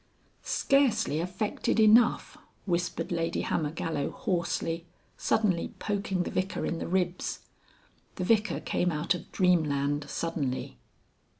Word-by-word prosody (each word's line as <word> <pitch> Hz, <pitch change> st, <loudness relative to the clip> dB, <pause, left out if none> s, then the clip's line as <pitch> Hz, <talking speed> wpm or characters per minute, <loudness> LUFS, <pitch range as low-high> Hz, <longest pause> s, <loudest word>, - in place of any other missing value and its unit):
"Scarcely 230 Hz, -, +2 dB
affected 185 Hz, +6 st, -1 dB
enough," 220 Hz, +2 st, +5 dB, 0.3 s
whispered 175 Hz, -2 st, -1 dB
Lady 165 Hz, -1 st, 0 dB
Hammergallow 155 Hz, -2 st, -1 dB
hoarsely, 170 Hz, -1 st, -2 dB, 0.3 s
suddenly 190 Hz, -6 st, 0 dB
poking 195 Hz, -3 st, -1 dB
the -, -, -5 dB
Vicar 185 Hz, +1 st, -1 dB
in 165 Hz, -, -2 dB
the -, -, -4 dB
ribs. 180 Hz, 0 st, -1 dB, 0.7 s
The 185 Hz, -, -3 dB
Vicar 210 Hz, +2 st, +2 dB
came 180 Hz, -, 0 dB
out 150 Hz, +4 st, +1 dB
of 175 Hz, -, -8 dB
Dreamland 145 Hz, -5 st, +1 dB
suddenly. 140 Hz, -, -3 dB
175 Hz, 110 wpm, -29 LUFS, 165-195 Hz, 0.7 s, enough